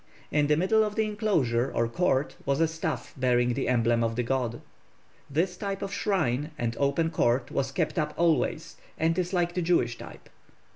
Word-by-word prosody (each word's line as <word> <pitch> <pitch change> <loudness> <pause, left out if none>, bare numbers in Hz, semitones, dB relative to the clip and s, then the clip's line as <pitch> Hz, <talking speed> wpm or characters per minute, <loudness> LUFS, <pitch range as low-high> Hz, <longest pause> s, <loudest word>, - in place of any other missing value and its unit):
In 150 -1 +2
the 150 0 +3
middle 220 +6 +3
of 210 -1 -3
the 220 - +1
enclosure 165 - 0
or 115 - +1
court 135 0 0
was 140 0 0
a 165 - +4
staff 160 0 -4
bearing 125 -2 +2
the - - -2
emblem 120 -1 +2
of 115 0 -1
the 125 - 0
god. 120 -2 -1 0.7
This 170 +6 0
type 200 0 -4
of 195 - -4
shrine 150 - 0
and 115 -1 -2
open 145 +4 +1
court 120 -1 +1
was 135 -2 -1
kept 165 +3 -1
up 150 -1 -2
always, 170 -2 +1 0.2
and 165 +1 +1
is 180 0 -1
like 175 -2 0
the 180 - -1
Jewish 145 -9 +1
type. - - -11
150 Hz, 190 wpm, -27 LUFS, 125-175 Hz, 0.7 s, a